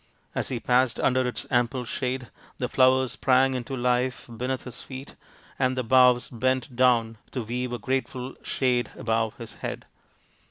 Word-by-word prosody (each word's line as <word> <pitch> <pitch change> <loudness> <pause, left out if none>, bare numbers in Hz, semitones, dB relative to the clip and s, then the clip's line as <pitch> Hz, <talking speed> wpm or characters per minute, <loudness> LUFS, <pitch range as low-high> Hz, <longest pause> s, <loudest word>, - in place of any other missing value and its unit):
As - - -1
he 125 - -2
passed 125 0 +2
under 130 -1 +2
its 125 - -4
ample 125 0 +1
shade, 125 +1 -3 0.3
the 125 - -1
flowers 130 0 +4
sprang 130 0 +3
into 130 +1 -4
life 125 +1 0
beneath 130 +3 -2
his 125 -2 -8
feet 135 +1 -9 0.4
and 130 -1 +1
the 130 - 0
boughs 125 0 +5
bent 130 +1 -1
down 115 -3 +3
to 125 - -3
weave 125 +3 -3
a 120 - -2
grateful 130 +1 -2
shade 125 -3 0
above 115 0 -1
his 115 -5 -9
head. - - -4
125 Hz, 160 wpm, -26 LUFS, 120-130 Hz, 0.4 s, boughs